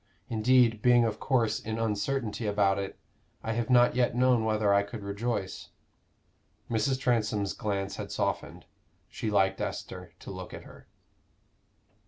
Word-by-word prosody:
Indeed, 115 -1 +3
being 120 0 +5
of 110 -1 -2
course 120 -5 +1
in 110 0 -4
uncertainty 110 +1 -1
about 100 -1 +2
it, 100 -1 -5 0.5
I 115 - -2
have 115 +1 -2
not 120 -1 +5
yet 125 -2 +2
known 125 -2 +3
whether 110 -2 +2
I 100 - +5
could 100 +1 -7
rejoice." 100 -1 -3 1.0
Mrs. 125 +4 +1
Transome's 110 -5 0
glance 100 -2 -3
had - - -6
softened. - - -3 0.4
She 110 - -4
liked 95 -2 +2
Esther 90 -2 -5
to - - -8
look 95 -1 -7
at - - -10
her. - - -15
110 Hz, 145 wpm, -29 LUFS, 100-120 Hz, 1.0 s, being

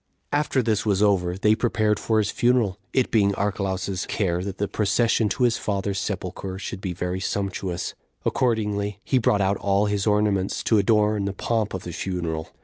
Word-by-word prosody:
3. 145 - +3
After 140 -3 0
this 110 -1 +1
was 105 -2 +2
over, 90 -3 +2
they 105 +2 +4
prepared 110 -2 +1
for 110 - +1
his 105 -2 +1
funeral, 120 -6 +2
it 130 - +1
being 100 -3 +3
Archelaus's 95 -2 -2
care 90 -4 0
that 100 0 -5
the 100 - -1
procession 110 +1 +2
to 110 - -1
his 120 -2 +3
father's 100 -1 -1
sepulcher 95 -1 -4
should 95 -1 -6
be 95 -3 -3
very 90 +1 -3
sumptuous. 95 -2 -3 0.3
Accordingly, 105 -5 0
he 130 - +2
brought 105 -3 +2
out 95 +1 +2
all 100 +1 +1
his 105 0 -1
ornaments 105 -2 +1
to 110 - +3
adorn 105 0 +2
the 100 - -2
pomp 110 0 -1
of 95 - -5
the 85 - -6
funeral. 85 -4 -3
100 Hz, 185 wpm, -24 LUFS, 95-110 Hz, 0.3 s, they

